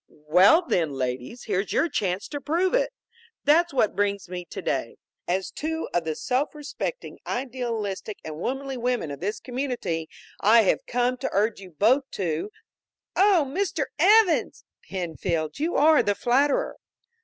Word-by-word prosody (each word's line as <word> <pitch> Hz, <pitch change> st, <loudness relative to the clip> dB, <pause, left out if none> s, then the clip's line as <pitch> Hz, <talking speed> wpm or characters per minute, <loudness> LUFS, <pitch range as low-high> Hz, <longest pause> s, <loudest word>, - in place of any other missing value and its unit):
"Well, 180 Hz, -, +4 dB
then, 165 Hz, -, 0 dB
ladies, 130 Hz, -, -4 dB
here's 200 Hz, -2 st, -1 dB
your 335 Hz, -, +2 dB
chance 195 Hz, -, -2 dB
to 290 Hz, -1 st, -5 dB
prove 345 Hz, -, +1 dB
it! -, -, +2 dB, 0.5 s
That's 335 Hz, +4 st, +4 dB
what 250 Hz, -6 st, +1 dB
brings 200 Hz, -2 st, 0 dB
me 180 Hz, 0 st, -6 dB
today. 135 Hz, -, -3 dB, 0.3 s
As 185 Hz, +2 st, -1 dB
two 320 Hz, +2 st, -3 dB
of 175 Hz, -1 st, 0 dB
the 160 Hz, -1 st, -2 dB
self 260 Hz, -, -1 dB
respecting, 300 Hz, -, -5 dB
idealistic 230 Hz, -6 st, -3 dB
and 155 Hz, -1 st, -6 dB
womanly 270 Hz, +5 st, -3 dB
women 245 Hz, -10 st, -1 dB
of 140 Hz, -, -7 dB
this 205 Hz, +4 st, -3 dB
community, 245 Hz, -, -3 dB, 0.3 s
I 225 Hz, +3 st, +6 dB
have 190 Hz, -, +1 dB
come 245 Hz, +1 st, +1 dB
to -, -, -3 dB
urge 210 Hz, +2 st, +1 dB
you 190 Hz, -2 st, -11 dB
both 240 Hz, -, +2 dB
to 170 Hz, 0 st, -2 dB, 0.3 s
" -, -, -68 dB, 0.3 s
"Oh, 380 Hz, -6 st, +4 dB
Mr. 330 Hz, 0 st, -1 dB, 0.2 s
Evans!" 395 Hz, 0 st, +4 dB, 0.2 s
"Penfield, 170 Hz, -, -3 dB
you 325 Hz, +4 st, -1 dB
are 310 Hz, +1 st, +6 dB
the 205 Hz, -, 0 dB
flatterer!" 270 Hz, +7 st, +1 dB
230 Hz, 155 wpm, -25 LUFS, 180-290 Hz, 0.5 s, I